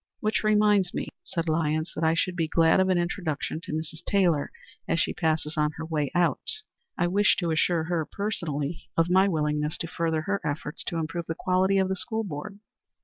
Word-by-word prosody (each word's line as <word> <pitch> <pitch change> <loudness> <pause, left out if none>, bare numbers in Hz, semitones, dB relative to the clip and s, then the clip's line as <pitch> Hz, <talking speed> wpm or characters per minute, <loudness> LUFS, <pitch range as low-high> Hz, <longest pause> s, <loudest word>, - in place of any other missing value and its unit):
"Which 215 +1 0
reminds 210 -3 +3
me," - - -3
said 165 -1 -3
Lyons, 155 0 0
"that 160 - -3
I 160 +1 +3
should 180 +2 0
be 165 -2 0
glad 165 +2 +4
of 190 0 +3
an 185 - +3
introduction 170 -3 -2
to - - -7
Mrs. 160 +1 -4
Taylor 175 -7 +2 0.4
as 165 - +1
she - - +1
passes 160 -2 0
us - - -11
on 150 0 +2
her 160 - -4
way 150 -3 -1
out. 175 -1 +2 0.6
I 175 - +2
wish 200 +4 +4
to 170 -3 0
assure 160 +1 +2
her 165 -2 -1
personally 170 -7 -3
of 165 +1 +3
my 190 +2 +5
willingness 150 -3 0
to 165 - -3
further 160 -2 -1
her 200 +3 -1
efforts 150 0 -3
to 170 - -3
improve 165 +1 -3
the 165 - -2
quality 185 +3 +2
of 190 -1 +3
the 190 - -1
school 220 +4 -2
board." 195 +2 -6
165 Hz, 205 wpm, -27 LUFS, 155-185 Hz, 0.6 s, my